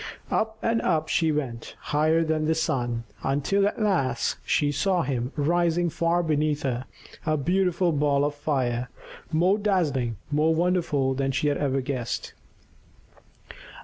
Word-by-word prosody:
Up 220 0 0
and 230 0 +1
up 160 -3 0
she 160 -2 +2
went, 130 -6 -4
higher 155 +2 +2
than 155 -1 0
the 160 +1 +2
sun, 120 -7 -1 0.2
until 145 +9 +1
at 205 - -3
last 135 - 0
she 145 -1 +1
saw 175 +5 +1
him 125 -1 -2
rising 170 +2 +1
far 170 +3 +1
beneath 150 -2 0
her, 130 -1 -2 0.4
a 155 -1 +1
beautiful 180 +3 +1
ball 145 -1 +2
of 145 - -1
fire, 125 -5 -1 0.4
more 180 +6 +3
dazzling, 145 - 0
more 155 +2 +3
wonderful 165 -6 +1
than 135 0 -1
she 135 +3 +1
had 145 - 0
ever 135 -2 0
guessed. 130 -3 -4
150 Hz, 145 wpm, -26 LUFS, 135-170 Hz, 0.4 s, more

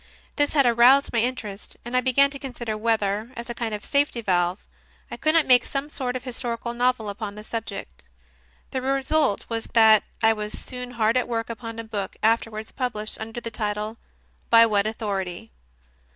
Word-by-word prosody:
This 290 -1 +1
had 280 -3 +4
aroused 245 +4 +5
my 230 - +2
interest, 225 -4 -3
and 240 +1 -4
I 255 - +4
began 275 +2 +4
to 275 - -6
consider 240 -5 -5
whether, 215 -1 0
as 235 0 -5
a - - -3
kind 230 -1 -3
of 210 - -9
safety 280 -3 +1
valve, 180 -3 0 0.5
I - - -5
could 310 +1 +2
not 325 -3 +5
make 250 -2 +6
some 275 +1 -4
sort 255 -4 -3
of 255 - -4
historical 235 -2 -4
novel 245 -2 +1
upon 205 0 -5
the 210 - -9
subject. 215 - -7 0.6
The 260 - -2
result 270 -2 +1
was 225 -1 -3
that 220 -2 +7 0.2
I 225 0 +6
was 210 -1 -5
soon 250 -1 -5
hard 225 +2 +3
at 250 - +1
work 230 -1 -2
upon 230 0 -7
a 230 - -4
book, 205 -3 -4
afterwards 220 -1 0
published 215 -5 -4
under 225 +2 -5
the 230 -1 -6
title, 215 0 -3 0.5
"By 230 0 +8
What 210 -2 +2
Authority?" 195 - -4
230 Hz, 185 wpm, -24 LUFS, 215-250 Hz, 0.6 s, By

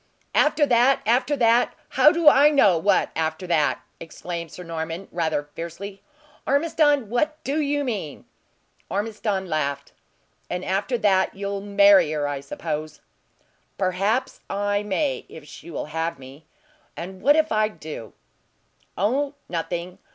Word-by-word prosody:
"After 300 0 +3
that! 250 +1 +3
After 250 +5 +2
that! 235 -1 +3
How 300 - +5
do 335 -1 0
I 290 0 +8
know 240 - +4
what 190 +5 +2
after 160 +2 -2
that!" 155 -6 +1 0.2
exclaimed 170 0 -7
Sir 180 - -9
Norman, 165 +2 -5
rather 160 -3 -1
fiercely. 190 +4 -7 0.5
"Ormiston, 290 -3 +2
what 300 +8 0
do 290 +3 -1
you 290 0 0
mean?" 205 - -4 0.6
Ormiston 205 -1 -2
laughed. 140 -4 -2 0.6
"And 180 +1 -3
after 200 +6 -1
that 195 -4 +2
you'll 200 0 -4
marry 200 -4 +5
her, 145 -1 -1
I 145 -1 -3
suppose!" 155 +2 -5 0.8
"Perhaps 195 +6 0
I 205 0 0
may, 210 +8 -1
if 160 -2 -11
she 160 - -12
will 165 - -4
have 165 0 -2
me. 135 +3 -14 0.5
And 185 +2 -7
what 290 +1 +5
if 315 0 +2
I 215 0 +3
do?" 155 - -9 0.8
"Oh, 275 +9 0
nothing! 175 +2 -4
195 Hz, 135 wpm, -24 LUFS, 165-245 Hz, 0.8 s, I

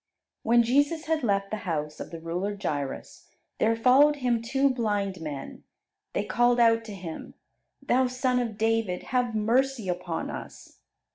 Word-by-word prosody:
When 235 +1 +4
Jesus 285 +7 +1
had 320 -1 0
left 195 -3 0
the 215 - -1
house 150 -7 -4
of - - -6
the 165 - -8
ruler 180 +5 -3
Jairus, 145 -8 -4 0.3
there 225 +1 +3
followed 265 +6 +5
Him 245 -4 0
two 270 +4 +1
blind 205 -7 -1
men. 145 -4 -7 0.5
They - - 0
called 240 0 +2
out 230 -1 +4
to 210 -2 -7
Him, 170 -4 -8 0.5
"Thou 255 -1 +2
Son 255 0 0
of 230 -4 -3
David, 225 -4 0
have 245 -3 +1
mercy 235 +1 +1
upon 180 -2 -3
us." - - -10
225 Hz, 155 wpm, -27 LUFS, 185-250 Hz, 0.5 s, followed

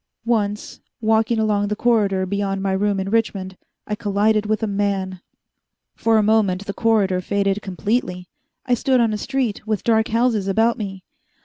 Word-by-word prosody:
Once, 210 -3 -1 0.2
walking 225 +1 +2
along 210 -2 +1
the 210 - -1
corridor 205 -5 +2
beyond 195 0 -2
my 195 0 -1
room 200 +1 0
in 190 - -3
Richmond, 195 -4 -1 0.3
I 210 - -4
collided 210 +1 +1
with 215 0 0
a - - +3
man. 195 -3 -2 0.7
For 225 -1 +2
a 215 - +3
moment 205 -3 +2
the 200 - -4
corridor 200 -5 +1
faded 200 +1 0
completely. 190 -2 -2 0.4
I 250 - +1
stood 255 +2 +2
on 230 -2 +2
a - - -1
street 255 -6 -2
with 215 -2 -1
dark 220 -1 +2
houses 230 -3 +1
about 225 +5 +2
me. 195 -3 -6
210 Hz, 170 wpm, -21 LUFS, 195-225 Hz, 0.7 s, a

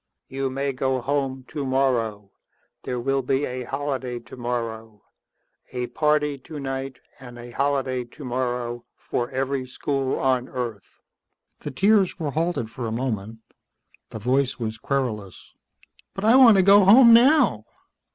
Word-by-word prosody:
"You 135 0 -2
may 135 +1 -2
go 130 0 -1
home 135 0 -2
tomorrow. 125 -7 -1 0.5
There 125 -1 -3
will 135 +2 0
be 135 +2 0
a 125 0 -5
holiday 130 -2 -3
tomorrow. 115 -3 -6 0.7
A 125 -1 -2
party 150 -2 +1
tonight 135 -3 -6 0.2
and 120 -2 -11
a 120 0 -10
holiday 135 -2 -1
tomorrow 120 -2 -4
for 120 0 -3
every 135 0 -2
school 135 +1 -2
on 130 -1 0
earth." 120 -6 -6 0.6
The - - -6
tears 195 +6 +2
were 150 -3 -2
halted 160 -7 -2
for 120 -1 -5
a - - -4
moment. 110 -2 -4 0.7
The - - -7
voice 130 +4 0
was 110 -2 -4
querulous. 110 -9 -4 0.6
"But 195 - -3
I 225 +3 +6
want 245 -6 +8
to 190 - +5
go 200 +1 +7
home 230 +5 +8
now." 245 - +4
130 Hz, 135 wpm, -24 LUFS, 120-145 Hz, 0.7 s, want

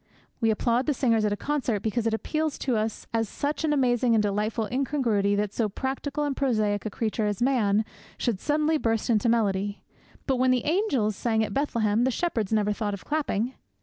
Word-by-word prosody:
We 225 - +2
applaud 235 +4 +1
the 295 - +2
singers 230 -4 +2
at 210 - +1
a 205 - -1
concert 260 -8 -1
because 225 +1 -1
it 225 - 0
appeals 310 +5 -2
to 255 -3 -1
us 215 0 -2
as 225 -2 0
such 290 +3 -2
an 310 - +1
amazing 245 -4 +2
and 215 - +3
delightful 210 +2 -1
incongruity 240 -7 +1
that 205 0 -1
so 225 -3 0
practical 270 +6 -3
and 285 -2 -1
prosaic 215 -6 0
a - - -2
creature 215 0 -1
as 205 -2 -2
Man 220 -5 +2 0.3
should 225 -6 -1
suddenly 305 +3 +1
burst 225 0 0
into 230 +1 +2
melody; 205 -3 0 0.4
but 265 -2 +1
when 255 +1 +3
the 255 -2 +2
angels 290 - +1
sang 220 0 +1
at - - -3
Bethlehem 230 -6 +1
the 260 - +3
shepherds 235 - -1
never 210 -1 +2
thought 205 -1 -2
of 195 - -13
clapping. 265 -6 -1
230 Hz, 200 wpm, -26 LUFS, 210-270 Hz, 0.4 s, and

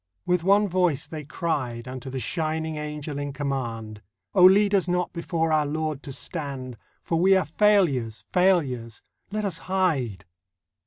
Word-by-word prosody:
With 180 -2 +1
one 200 +3 +4
voice 180 -6 +1
they 155 -2 -7
cried 130 -6 -3
Unto 130 +1 -7
the 130 0 -4
shining 160 +2 -2
Angel 150 -1 -5
in 145 -1 -4
command: 120 -7 -4 0.3
'Oh, 180 - +7
lead 200 +2 +6
us 190 -3 +3
not 180 0 -1
before 165 -1 -1
our 150 -1 +2
Lord 155 -1 -2
to 140 - -8
stand, 135 -4 -4 0.3
For 165 - 0
we 190 +2 +5
are 185 - +1
failures, 155 - +2
failures! 140 - +1 0.3
Let 210 +1 -2
us 185 -5 -1
hide. 140 - -1
155 Hz, 155 wpm, -25 LUFS, 130-180 Hz, 0.3 s, Oh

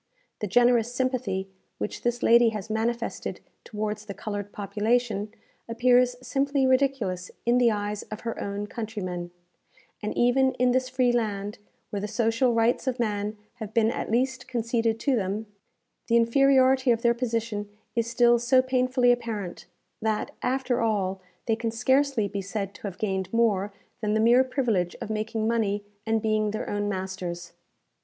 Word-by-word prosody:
The 210 - -2
generous 240 +2 +4
sympathy 245 -7 -1 0.3
which - - -4
this 240 0 -1
lady 235 0 +6
has 215 0 -5
manifested 230 +2 -2 0.2
towards 210 0 -4
the 200 - -6
coloured 205 -1 -5
population 210 +1 -1 0.4
appears 245 +1 +3
simply 275 +1 +1
ridiculous 260 -9 +1 0.2
in 240 +1 +4
the 240 -1 +5
eyes 205 -1 -2
of 215 - -6
her 230 -1 -4
own 200 +1 -3
countrymen; 205 -6 -5 0.7
and 210 - -4
even 260 +2 +3
in 250 0 +2
this 255 0 +1
free 255 -1 +2
land, 210 -3 -2 0.3
where 205 - -2
the 205 - -3
social 230 +3 +1
rights 230 +4 +2
of 255 -1 -1
man 210 -2 -1 0.2
have 215 -3 -7
been 225 -1 +4
at - - -4
least 255 +3 0
conceded 230 -2 0
to 275 -3 +2
them, 205 0 -2 0.6
the 230 - +2
inferiority 260 +2 +4
of 230 -1 +2
their 235 0 +5
position 230 -4 -2 0.3
is 230 -1 0
still 240 0 +4
so 255 +2 +4
painfully 255 -1 +3
apparent, 225 -7 -3 0.3
that, 215 -1 -1
after 255 -1 0
all, 195 -4 0 0.2
they 225 - +2
can 230 0 -2
scarcely 260 0 +2
be 200 0 -4
said 195 0 -4
to - - -15
have 185 -2 -7
gained 190 -3 -2
more 210 -4 +2 0.3
than 210 -1 0
the - - +2
mere 240 +3 +6
privilege 240 -9 0
of 220 - -5
making 215 +1 -2
money 210 -3 0 0.2
and 225 0 +1
being 215 -1 +1
their 215 +1 -4
own 205 0 -1
masters. 185 -3 -5
225 Hz, 160 wpm, -26 LUFS, 205-245 Hz, 0.7 s, lady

